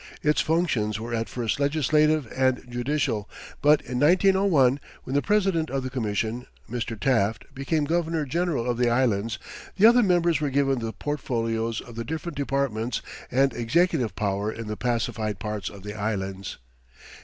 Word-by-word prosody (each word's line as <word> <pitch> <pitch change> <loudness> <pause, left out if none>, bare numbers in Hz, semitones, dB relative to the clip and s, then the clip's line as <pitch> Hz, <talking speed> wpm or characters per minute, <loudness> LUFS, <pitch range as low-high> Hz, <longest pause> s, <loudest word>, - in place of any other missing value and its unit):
Its 150 0 +3
functions 130 - 0
were 115 +2 -5
at 115 -2 -1
first 120 +3 -2
legislative 150 +1 +2
and 130 -1 +1
judicial, 120 -3 -1 0.3
but 150 +1 +5
in 125 0 -4
1901, 175 -4 +4 0.2
when 130 - -6
the 145 - +3
president 195 -6 +1
of 135 0 -2
the 130 - -4
Commission, 115 0 -2 0.2
Mr. 115 -1 -4
Taft, 110 -1 +1
became 145 +3 -1
Governor 165 -1 0
General 155 -4 -1
of 120 -1 -1
the 120 -1 +3
Islands, 115 -3 +1 0.4
the 200 - +6
other 240 +2 +7
members 175 -6 +2
were 145 - +1
given 135 -1 +1
the 115 -1 -3
portfolios 115 -5 -2
of 120 - -12
the 115 - -3
different 160 +5 -5
departments 135 -4 -1 0.3
and 135 +2 +2
executive 125 +1 +1
power 100 +1 -1
in 115 0 -7
the 105 0 -4
pacified 115 -3 -1
parts 105 0 -4
of 100 -2 -12
the 105 0 -6
Islands. 100 -3 -3
125 Hz, 160 wpm, -25 LUFS, 115-150 Hz, 0.4 s, other